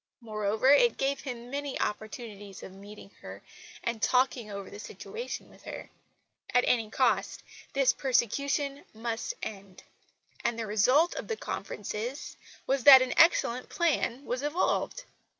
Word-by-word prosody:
Moreover, 215 0 -1
it 475 +12 +5
gave 275 0 0
him 245 -3 -7
many 285 0 -3
opportunities 210 -3 -5
of 190 - -9
meeting 200 +1 -12
her, - - -10 0.4
and 235 -2 -2
talking 250 -2 +2
over 200 -1 -6
the - - -10
situation 455 - -7
with - - -19
her. - - -8 0.6
At 245 - +6
any 225 -3 +1
cost 255 +2 0 0.3
this 275 -2 +3
persecution 275 +3 0
must 230 - -3
end; 195 -3 -8 0.6
and 235 - 0
the 230 - -3
result 255 - +3
of - - -6
the 450 - -3
conferences 225 - -5 0.3
was 270 -1 0
that 265 -2 +11
an 255 - -2
excellent 255 -7 +4
plan 285 -6 0
was 250 +1 -2
evolved. 335 +10 -1
245 Hz, 140 wpm, -29 LUFS, 215-280 Hz, 0.6 s, that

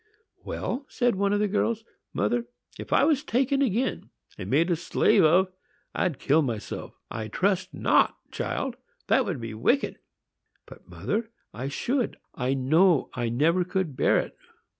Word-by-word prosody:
"Well," 275 +3 -4
said 245 -2 +1
one 200 +1 +1
of 205 - +2
the 210 - +2
girls, 220 +2 0 0.3
"mother, 120 +3 0 0.3
if - - -8
I - - +4
was 295 -1 +3
taken 275 +1 +1
again 255 0 0 0.3
and 90 - -7
made 165 +7 +3
a - - +3
slave 170 +1 +3
of, 180 +4 +4 0.4
I'd 160 -7 0
kill 150 +4 +3
myself." 115 -7 -4 0.2
"I 110 -1 -4
trust 190 - 0
not, - - +3 0.2
child,—that 260 0 -2
would 175 -9 -3
be 115 -1 -6
wicked." 180 - +1 0.7
"But, - - -15
mother, 220 +2 -2 0.2
I 130 +2 -4
should; 240 - -1 0.2
I 130 +1 -1
know 155 +5 +3
I 120 -2 -2
never 160 +10 +2
could 185 -5 -2
bear - - +3
it." - - -2
185 Hz, 155 wpm, -26 LUFS, -, 0.7 s, I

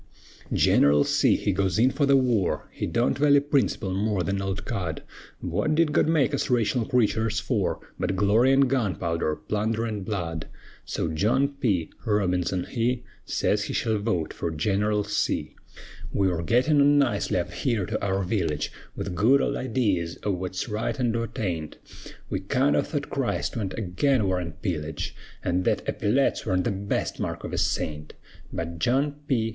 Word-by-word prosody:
Gineral 70 0 +4
C. - - +3
he - - 0
goes 95 0 0
in 125 +4 +4
fer 140 +1 +1
the 140 0 +6
war; 120 -8 +1
He - - -3
don't 120 +1 +1
vally 145 -1 +6
princerple 140 -9 0
more 100 -1 0
'n 90 - -2
an 100 0 -1
old 95 0 -3
cud; 85 -5 -3 0.4
Wut 155 - 0
did 160 -2 +2
God - - +3
make 155 -3 +2
us 140 - 0
raytional 120 -1 +1
creeturs 110 -2 +2
fer, 105 -2 0 0.2
But 95 - 0
glory 105 +7 +4
an' 135 +1 +5
gunpowder, 95 - 0
plunder 110 +7 -1
an' 105 -3 -3
blood? 85 -5 -3 0.4
So - - -2
John 115 - +2
P. 105 - -1
Robinson 90 -4 0
he 120 0 -1 0.2
Sez - - 0
he - - -4
shall 110 -2 0
vote 95 -7 -1
fer 85 - -3
Gineral 105 +6 0
C. 105 0 -1 0.6
We 95 -1 +2
were 85 -2 -1
gittin' 130 - +3
on 145 +1 +5
nicely 120 -11 +1
up 90 - -2
here 115 -8 0
to - - -3
our 95 0 0
village, 85 -6 -1 0.2
With 95 - -4
good 115 +10 +4
old - - 0
idees 100 -11 -1
o' 105 - +1
wut's 95 0 -3
right 110 +3 -2
an' 120 -2 +2
wut 115 -1 -3
aint, 85 -7 -3 0.5
We 95 - -2
kind 130 +9 +1
o' - - +4
thought 145 -2 -4
Christ 135 -3 -1
went 100 -5 -3
agin 115 +5 +1
war 90 -1 0
an' 85 -2 -5
pillage, 80 -5 -3 0.3
An' 90 +1 +1
thet - - 0
eppyletts 130 +7 +1
worn't 90 -2 +1
the - - 0
best 100 +1 -2
mark - - -3
of - - -6
a - - 0
saint; 75 -1 -2 0.4
But 85 0 -4
John 140 - +1
P. 115 -4 +1
105 Hz, 175 wpm, -26 LUFS, 90-125 Hz, 0.6 s, the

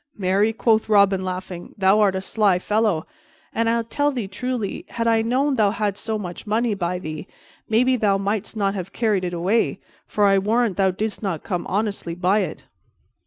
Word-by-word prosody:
"Marry," 200 +3 +2
quoth 225 -1 +1
Robin, 200 -2 +4
laughing, 185 -1 -6
"thou 195 +1 +4
art 200 -3 +3
a 190 - -2
sly 200 -2 +2
fellow, 210 -3 0 0.5
and 230 0 +1
I 230 0 +1
tell 290 +5 0
thee 240 -7 -3
truly, 230 +1 -4
had 230 - -3
I 225 -1 +3
known 260 +5 +1
thou 210 -2 +4
hadst 205 -1 -2
so 220 -1 -1
much 180 0 -7
money 225 +2 +1
by 180 -2 -2
thee 155 -3 -6 0.4
maybe 250 +4 +3
thou 205 -3 +2
mightst 200 +2 -3
not 195 -1 +1
have 190 -2 -6
carried 215 -5 +1
it 175 -1 -3
away, 190 +7 +1 0.3
for 210 - +1
I 195 -1 +5
warrant 220 +1 +1
thou 195 -1 +3
didst 210 +3 -3
not 190 -7 -3
come 180 -3 -3
honestly 200 -4 -2
by 185 +4 +2
it." - - -4
205 Hz, 190 wpm, -22 LUFS, 190-225 Hz, 0.5 s, I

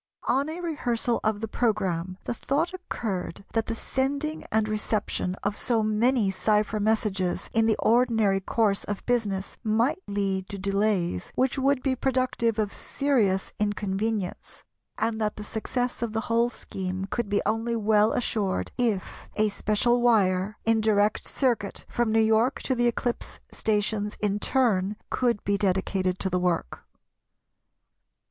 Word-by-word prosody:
On 275 +4 +2
a 335 +3 -5
rehearsal 245 -8 0
of 215 -1 0
the 225 - -2
programme 190 -6 -1
the - - -2
thought 295 +9 -1
occurred 205 - -4
that 225 -1 0
the 230 - -2
sending 280 +6 -2
and 220 0 +2
reception 210 -3 -1
of 200 +1 0
so 230 -1 0
many 215 0 +2
cypher 210 +2 +1
messages 205 -4 0
in 225 0 +3
the 220 - +3
ordinary 225 -4 +3
course 200 +1 +1
of 205 -1 -5
business 205 -6 -1
might 230 - +1
lead 195 -2 -1
to 200 - -5
delays 195 - 0
which 265 +2 +1
would 270 -1 +2
be 265 -2 +1
productive 255 -3 0
of 210 -2 0
serious 225 -10 0
inconvenience, 205 -1 -2 0.3
and 220 0 -1
that 210 -1 0
the 210 - -7
success 245 +4 -2
of 235 -2 -2
the 220 - 0
whole 230 +1 +2
scheme 190 -4 -5
could 225 +1 -3
be 205 - +1
only 225 +2 0
well 215 -1 +3
assured 195 - -1
if 220 -6 -1
a 215 0 +3
special 215 +4 +1
wire, 205 -4 +3
in 225 -1 +3
direct 210 -1 +2
circuit 235 -7 -1
from 240 -2 0
New 225 - +4
York 220 +4 +3
to 260 - +1
the 240 -1 +2
eclipse 240 0 -2
stations 210 -1 -1
in 205 -1 0
turn, 210 -6 +2 0.2
could 240 -4 +1
be 200 0 0
dedicated 190 -1 0
to 190 - -2
the 180 -1 0
work. 180 - -1
215 Hz, 150 wpm, -26 LUFS, 200-240 Hz, 0.3 s, New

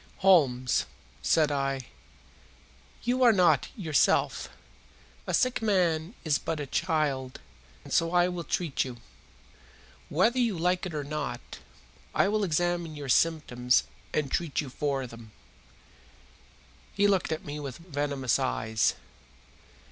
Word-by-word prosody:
"Holmes," 130 -10 +4 0.3
said 155 -2 +3
I, 135 -1 -1 1.2
"you 250 +2 0
are 245 -2 +7
not 175 - +3
yourself. 160 -7 +1 0.8
A - - -2
sick 255 -3 +1
man 180 -3 +1
is 150 -3 +1
but 165 -2 -3
a 145 - -3
child, 145 -5 -1 0.4
and - - -7
so 165 0 +2
I 175 0 +4
will 180 -1 -4
treat 165 -2 -1
you. 125 -2 -7 1.1
Whether 225 - +2
you 230 -7 +1
like 180 +2 0
it 170 - -7
or 150 - -2
not, 145 -3 -5 0.6
I - - +4
will 215 0 +1
examine 175 -2 0
your 145 -2 -7
symptoms 125 -5 +2 0.3
and 145 -3 -1
treat 165 -5 -1
you 145 - -2
for 135 -1 -1
them." 115 -3 -12 1.6
He 200 - +3
looked 195 -5 +2
at 160 - -3
me 145 +1 -5
with 140 -4 -6
venomous 145 -6 -1
eyes. 85 - 0
155 Hz, 130 wpm, -28 LUFS, 135-180 Hz, 1.6 s, are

